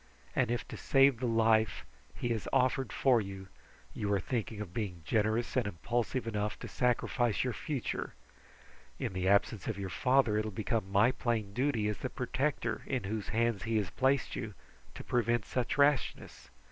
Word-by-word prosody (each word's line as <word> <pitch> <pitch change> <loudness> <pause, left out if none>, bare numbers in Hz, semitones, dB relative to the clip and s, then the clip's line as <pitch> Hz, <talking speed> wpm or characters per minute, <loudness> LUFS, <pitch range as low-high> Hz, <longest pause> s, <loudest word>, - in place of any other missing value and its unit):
And 125 -3 +2
if 120 0 -2
to - - -6
save 135 -3 +4
the 125 - -1
life 110 - +2 0.3
he 120 - -3
has 115 -3 -2
offered 130 0 +2
for 125 -4 +3
you, 95 -1 -8 0.4
you 105 -1 -2
are 100 - +3
thinking 110 0 -3
of 100 -5 -6
being 95 -7 -4
generous 110 +4 +1
and 125 -5 +2
impulsive 120 - -2
enough 105 -2 -2
to - - -5
sacrifice 120 -2 +1
your 125 -2 -1
future 140 -2 -3 0.8
in - - -3
the 95 0 -1
absence 100 0 +2
of 110 - -2
your 95 -2 -4
father, 125 -2 +3
it - - 0
will 110 - -3
become 110 -1 -2
my 105 +5 +5
plain 115 -6 -2
duty, 125 -3 +1
as 105 - -2
the 130 - -3
protector 125 -2 -1
in 130 -2 -1
whose 105 +1 -3
hands 115 -3 +1
he 115 0 +1
has 100 -5 -1
placed 135 +1 +1
you, 105 -3 -5 0.4
to - - -7
prevent 120 -2 +1
such 125 +2 -2
rashness. 140 -2 +1
115 Hz, 180 wpm, -32 LUFS, 105-125 Hz, 0.8 s, my